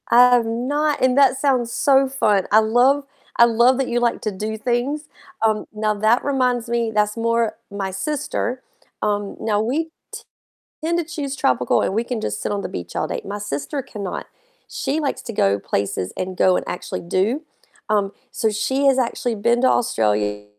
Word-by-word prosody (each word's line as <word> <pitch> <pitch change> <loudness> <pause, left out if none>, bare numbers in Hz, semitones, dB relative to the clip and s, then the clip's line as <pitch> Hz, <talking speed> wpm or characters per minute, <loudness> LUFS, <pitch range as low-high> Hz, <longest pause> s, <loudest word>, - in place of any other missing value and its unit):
I 245 +1 +7
have 235 -2 +2
not, 285 +7 -1
and 260 0 +3
that 270 -2 +5
sounds 260 -4 +1
so 270 +1 +3
fun. 210 -8 +1
I 215 - +7
love 245 +6 +3 0.3
I 235 - +8
love 235 +2 +4
that 270 -1 0
you 240 - 0
like 240 -1 0
to 215 - -2
do 215 +3 -4
things, 250 +6 -1 0.3
um, 215 -1 +1
now 215 0 0
that 215 +4 +2
reminds 250 -4 0
me 235 -1 0
that's 210 0 +1
more 230 0 +1 0.2
my 200 -1 -3
sister, 255 +3 -3 0.4
um, 205 -1 -1
now 210 -2 0
we 270 +9 0
t - - -23 1.0
tend 340 +1 +1
to 345 - 0
choose 295 -4 -4
tropical, 125 - +2
and - - -1
we 225 +2 0
can 240 -2 -3
just 105 - -3
sit - - -2
on 205 - -1
the - - -4
beach 90 - -7
all - - -1
day, - - -4
my 205 +1 -5
sister 205 - -4
can 210 -4 -8
not, 185 - -4 0.4
she 285 +3 -2
likes 285 -3 -2
to 230 - -6
go 100 - +2
places 100 -2 -2
and 185 0 -4
go 185 0 +4
and - - -2
actually - - -4
do. 200 - 0 0.5
Um, 205 -2 +1 0.2
so 220 - 0
she 265 +6 0
has 270 -1 +4
actually 245 -1 -1
been 235 +3 +1
to 260 - +5
Australia, 105 - +1
230 Hz, 195 wpm, -21 LUFS, 205-260 Hz, 1.0 s, I